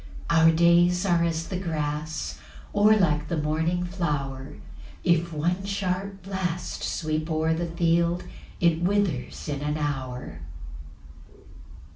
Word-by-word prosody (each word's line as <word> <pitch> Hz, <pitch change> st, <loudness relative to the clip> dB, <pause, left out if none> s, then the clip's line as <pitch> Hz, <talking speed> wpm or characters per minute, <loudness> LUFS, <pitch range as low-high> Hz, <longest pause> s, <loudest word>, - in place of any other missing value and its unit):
7 165 Hz, -1 st, +5 dB
Our 165 Hz, 0 st, +7 dB
days 175 Hz, +2 st, +4 dB
are 175 Hz, -3 st, +3 dB
as 165 Hz, 0 st, -1 dB
the 185 Hz, -, -3 dB
grass, 155 Hz, -3 st, -3 dB, 0.3 s
Or 210 Hz, +1 st, +6 dB
like 150 Hz, -6 st, +2 dB
the 170 Hz, -, -1 dB
morning 160 Hz, +4 st, 0 dB
flower; 145 Hz, -, -3 dB, 0.5 s
If 170 Hz, 0 st, +2 dB
one 170 Hz, +5 st, -1 dB
sharp 195 Hz, -1 st, -3 dB
blast 185 Hz, -3 st, -3 dB
sweep 155 Hz, 0 st, -2 dB
o'er 160 Hz, 0 st, +1 dB
the 170 Hz, +1 st, -2 dB
field, 170 Hz, +1 st, +1 dB, 0.4 s
It 170 Hz, -1 st, +3 dB
withers 185 Hz, -9 st, 0 dB
in 145 Hz, -2 st, -3 dB
an 150 Hz, +1 st, -1 dB
hour. 130 Hz, -, -4 dB
170 Hz, 125 wpm, -26 LUFS, 155-180 Hz, 0.5 s, Our